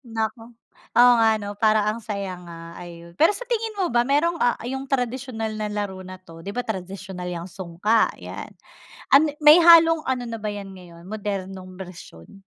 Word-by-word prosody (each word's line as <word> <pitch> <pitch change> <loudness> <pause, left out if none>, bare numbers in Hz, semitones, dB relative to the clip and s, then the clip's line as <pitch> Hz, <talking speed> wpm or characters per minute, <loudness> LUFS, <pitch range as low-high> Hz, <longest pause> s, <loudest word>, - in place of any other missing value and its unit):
Naku, 225 +1 -2 0.6
oo 245 0 +8
nga 225 -1 +3
'no 205 0 -6
parang 215 0 +2
ang 230 - -8
saya 200 -3 -4
nga, 170 -1 -11
ayun. 170 -1 -11
Pero 320 - +4
sa - - -7
tingin 450 -3 -2
mo 370 - +1
ba 240 -3 +2
mayrong, 295 +6 +1
ah,' 245 -7 +1
yung 265 +1 -4
tradisyonal 250 -4 -3
na 215 -1 -4
laro 200 -2 -4
na'to. 185 -3 -12
Di 200 - -5
ba 245 - -4
tradisyonal 190 -2 -6
'yang 170 0 -6
sungka, 190 +5 0
'yan, - - -8 0.6
ano-may 300 +2 +6
halong 330 -1 +6
ano 255 -1 -1
na 230 -1 -6
ba 215 - -5
'yan 205 -2 -6
ngayon 175 -3 -14
modernong 190 -2 -6
bersyon? 180 - -12
210 Hz, 170 wpm, -23 LUFS, 185-255 Hz, 0.6 s, oo